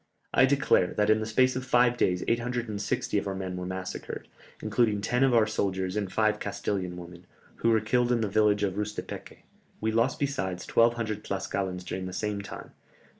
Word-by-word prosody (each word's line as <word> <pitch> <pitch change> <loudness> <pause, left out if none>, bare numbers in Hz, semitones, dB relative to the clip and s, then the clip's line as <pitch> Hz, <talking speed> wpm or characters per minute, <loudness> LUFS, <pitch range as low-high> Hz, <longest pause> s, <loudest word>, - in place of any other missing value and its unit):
I 135 - +6
declare 135 -9 +2
that 105 0 +3
in 110 - +4
the 110 - -3
space 130 +3 +3
of 130 - -2
five 125 -1 +3
days 90 -6 +1
860 115 -4 -1
of 100 - -5
our 95 - -2
men 95 -1 -4
were 90 0 -4
massacred, 95 0 -5 0.3
including 110 -4 +1
ten 125 +5 +1
of 130 -2 +4
our 115 -2 +5
soldiers 95 -3 -1
and 100 -3 -2
five 110 -1 +2
Castilian 100 -3 -3
women, 90 0 -11 0.3
who 115 - +1
were 110 -1 +4
killed 120 +3 +1
in 120 -2 +2
the 110 - +1
village 105 0 +3
of 95 -2 +1
Rustepèque; 105 0 -5 0.4
we 110 +1 0
lost 115 +6 +2
besides 95 - -2
1200 115 -2 +2
Tlascalans 95 -1 -3
during 95 +1 -4
the 95 - -7
same 105 0 -2
time. 100 - -9
105 Hz, 185 wpm, -28 LUFS, 95-120 Hz, 0.4 s, I